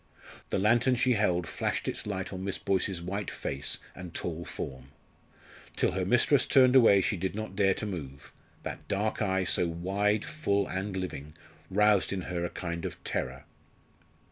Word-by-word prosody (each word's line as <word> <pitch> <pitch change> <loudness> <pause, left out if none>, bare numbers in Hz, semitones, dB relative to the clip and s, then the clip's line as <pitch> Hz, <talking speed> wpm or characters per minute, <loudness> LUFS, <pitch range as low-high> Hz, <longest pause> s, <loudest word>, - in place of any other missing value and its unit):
The - - 0
lantern 120 +6 +3
she 125 +1 +3
held 90 -5 +1
flashed 80 - -2
its - - -2
light 95 -1 -3
on 95 0 -5
Miss 100 0 -2
Boyce's 95 -2 -1
white 100 +3 -3
face 70 +2 -3 0.2
and 90 -2 -9
tall 85 -1 -3
form. 65 -3 -6 0.9
Till - - +2
her - - -1
mistress - - +4
turned 130 -1 +6
away 110 -6 +7
she 105 - 0
did 95 +3 -2
not 110 -2 -5
dare 95 -1 +3
to - - -4
move; 70 -9 -7 0.3
that - - -6
dark 105 +3 -1
eye, 95 -2 +1
so 90 0 +2
wide, 100 +5 0
full, 100 -11 0
and 95 +1 -3
living, 75 -5 -5 0.3
roused 105 0 +3
in 95 -1 -2
her 85 -1 -3
a 85 - -1
kind 85 -2 -5
of - - -4
terror. 65 +1 -3
95 Hz, 170 wpm, -29 LUFS, 85-105 Hz, 0.9 s, away